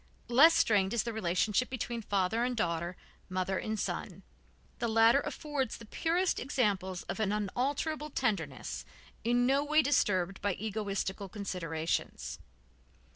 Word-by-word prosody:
Less 300 +7 +7
strained 200 -1 +3
is 235 - +2
the 235 - -3
relationship 210 +4 +1
between 240 -2 -3
father 205 +2 +1
and 250 -1 -1
daughter, 170 -2 -1 0.3
mother 185 +1 -1
and 220 -1 -3
son. - - -4 0.6
The 235 - 0
latter 225 +3 +5
affords 290 -3 -3
the 230 - -11
purest 340 - 0
examples 200 -9 0
of - - -5
an 210 -2 +1
unalterable 275 - -1
tenderness, 235 -7 -2 0.4
in 240 +1 +3
no 275 +3 +3
way 305 +1 +4
disturbed 195 -9 +1
by 205 -1 +1
egoistical 200 -2 -3
considerations. 170 -6 -3
220 Hz, 130 wpm, -31 LUFS, 195-255 Hz, 0.6 s, Less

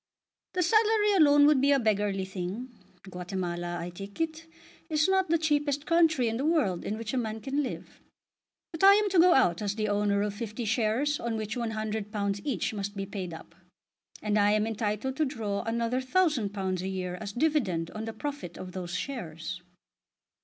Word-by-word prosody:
"The 360 - +1
salary 430 +2 +3
alone 290 -5 +6
would 295 -3 +5
be 280 +1 +4
a 280 - +5
beggarly 205 -4 0
thing. 190 +7 -5 0.4
Guatemala, 175 -1 -4
I 175 +1 -5
take 195 - -10
it, 325 0 -3 0.4
is 305 0 +2
not 380 -2 +2
the 335 - +4
cheapest 295 -2 0
country 325 -7 +3
in 225 0 -1
the 265 - -2
world 295 - +1
in 215 - -3
which 225 0 -5
a - - 0
man 220 -2 -3
can 275 +5 -1
live. 270 - -6 0.7
But 325 +1 -5
I 395 +1 +9
am 415 -1 +1
to 365 - +4
go 350 +1 +7
out 175 -9 +3
as 205 -1 -1
the 215 -1 -1
owner 205 0 +1
of 205 -1 -2
fifty 220 +2 -5
shares 230 +7 +1
on 235 -1 -2
which 215 +1 -4
£100 215 -3 -2
each 250 -7 -1
must 205 0 -4
be 195 - -2
paid 190 -3 -5
up, 165 0 -10 0.7
and 210 0 +1
I 205 0 +4
am 215 0 +2
entitled 220 +3 -2
to 315 - +2
draw 220 -7 -3
another 235 +2 0
£1000 210 - 0
a 190 - -3
year 180 -1 -4
as 205 -2 -5
dividend 215 - 0
on 215 +1 -5
the 225 - -5
profit 280 - -6
of 185 - -7
those 180 -1 -5
shares." 185 - -5
220 Hz, 190 wpm, -28 LUFS, 200-290 Hz, 0.7 s, I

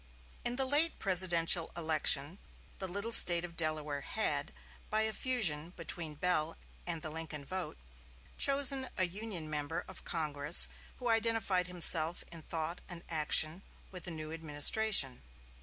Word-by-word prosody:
In 240 - -2
the 265 +1 0
late 295 +5 +1
presidential 175 -3 +1
election 155 0 0 0.4
the 190 - -6
little 200 +5 -6
State 175 -6 +8
of 170 -1 -13
Delaware 155 -3 -3
had, - - -2 0.4
by 215 - -1
a 220 0 -2
fusion 180 - -1
between 170 -2 -6
the - - -20
Bell 165 -2 -2 0.3
and 165 -2 -5
the 155 - -7
Lincoln 160 -2 -7
vote, 185 - -6 0.6
chosen 275 -1 +3
a 185 - +1
Union 185 -3 -7
member 150 +1 -5
of 190 - -12
Congress, 150 -1 +3 0.3
who 250 - -7
identified 225 -5 -1
himself 170 -2 +5
in 165 -1 -10
thought 165 +2 -6
and 175 -2 -9
action 155 +1 +1 0.3
with 180 -3 -11
the - - -7
new 155 -2 -9
administration. 160 - +1
170 Hz, 145 wpm, -31 LUFS, 155-200 Hz, 0.6 s, State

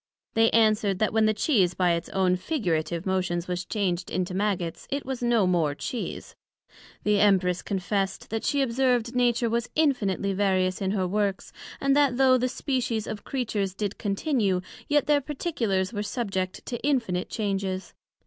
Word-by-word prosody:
They 225 0 +4
answered, 215 -3 +3
That 215 +2 0
when 220 -1 +4
the 215 - +3
Cheese 195 - +2
by 180 -2 +2
its 170 0 -2
own 185 -1 +2
figurative 175 - -2
motions 185 -2 -1
was 180 0 -2
changed 185 -4 -1
into 185 0 -2
Maggots, 185 -4 -2
it 280 +1 -2
was 260 -2 -4
no 235 -4 +3
more 165 -5 +1
Cheese. 235 +9 -5 0.7
The 210 -1 +3
Empress 185 -3 +3
confessed 195 +1 -2
that 225 0 -2
she 280 -1 +2
observed 245 -1 +1
Nature 240 -1 +2
was 235 +1 -1
infinitely 205 - +1
various 185 -1 +1
in 190 - 0
her 190 -2 0
works, 200 0 -1 0.3
and 275 0 +2
that 280 -4 +3
though 260 -1 +5
the 255 +1 0
species 245 -5 -2
of 210 - -6
Creatures 210 -7 -2
did 205 -1 -3
continue, 200 - 0 0.3
yet 295 -1 +2
their 295 -1 +3
particulars 240 - -1
were 205 - -2
subject 195 -4 -3
to 240 - -5
infinite 230 -11 0
changes. 195 -3 -2
205 Hz, 165 wpm, -26 LUFS, 185-245 Hz, 0.7 s, though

